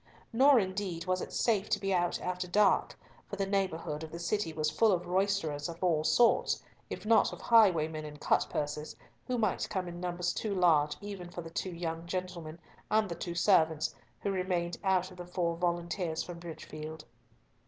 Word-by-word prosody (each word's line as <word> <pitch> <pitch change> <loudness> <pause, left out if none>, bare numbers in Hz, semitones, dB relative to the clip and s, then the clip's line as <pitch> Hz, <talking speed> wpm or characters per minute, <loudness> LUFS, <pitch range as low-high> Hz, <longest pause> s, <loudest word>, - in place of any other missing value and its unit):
Nor, 265 +2 +6
indeed, 185 -3 -3
was 185 0 0
it - - -6
safe 215 -3 +1
to 210 - +1
be 195 0 -1
out 175 -1 +1
after 180 0 -3
dark, 205 +3 +3 0.3
for - - -5
the 195 -1 -1
neighbourhood 185 -6 -1
of 160 - -8
the 170 - -6
city 170 +1 -1
was 155 -1 -1
full 220 +7 +4
of 180 -2 0
roisterers 180 -5 0
of 170 +2 -8
all 165 -4 +2
sorts, 235 +8 +3 0.3
if - - -6
not 225 0 +4
of - - -8
highwaymen 165 -9 +4
and 150 -1 -9
cutpurses, 150 +1 -1 0.3
who 250 - 0
might 220 -2 0
come 185 -3 -2
in 175 0 -7
numbers 180 0 -1
too 210 -3 -2
large 155 -5 +3
even 200 -4 -7
for 175 - -6
the 165 - -9
two 185 - -3
young 165 -1 -4
gentlemen 175 -3 -4 0.3
and 215 -2 +2
the 170 - -4
two 170 +1 -5
servants, 160 -5 +3 0.3
who 200 - -1
remained 180 -2 -1
out 190 -1 +2
of 180 - -13
the 175 -1 -8
four 175 -2 -1
volunteers 170 -1 -1
from 175 -1 -8
Bridgefield. 160 -2 -8
175 Hz, 185 wpm, -31 LUFS, 165-195 Hz, 0.3 s, Nor